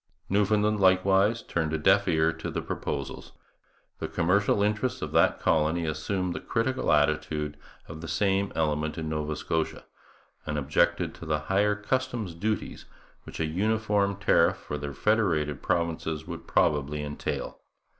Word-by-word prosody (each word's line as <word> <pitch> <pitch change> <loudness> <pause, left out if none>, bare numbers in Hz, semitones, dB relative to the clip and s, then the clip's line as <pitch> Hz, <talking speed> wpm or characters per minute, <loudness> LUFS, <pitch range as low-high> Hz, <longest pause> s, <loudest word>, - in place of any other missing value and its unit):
Newfoundland, 105 +1 +2
likewise, 95 +4 +3
turned 80 -2 -2
a - - +1
deaf 95 +6 +3
ear 80 -2 +2
to - - -6
the - - -3
proposals. - - -5 0.7
The - - -3
commercial 100 +4 +2
interests 105 +5 -1
of - - -4
that - - +3
colony 80 +1 +1
assumed 90 +4 -2
the - - -4
critical 130 +3 0
attitude 75 0 +1 0.3
of 80 0 -8
the 85 - -6
same 95 +3 +1
element 75 -1 0
in 80 -1 -3
Nova 75 0 -2
Scotia, 80 +1 -2 0.6
and 75 -1 -3
objected 70 0 +1
to - - -10
the 75 -1 0
higher 105 +2 +3
customs 115 -2 -2
duties 105 +6 -3 0.4
which - - -9
a 80 - +1
uniform 100 +3 +1
tariff 100 +1 +3
for - - -6
the 70 -1 -4
federated 80 -6 +1
provinces 80 -2 -1
would 85 -1 -8
probably 75 0 +1
entail. 75 0 -4
85 Hz, 145 wpm, -27 LUFS, 75-105 Hz, 0.7 s, likewise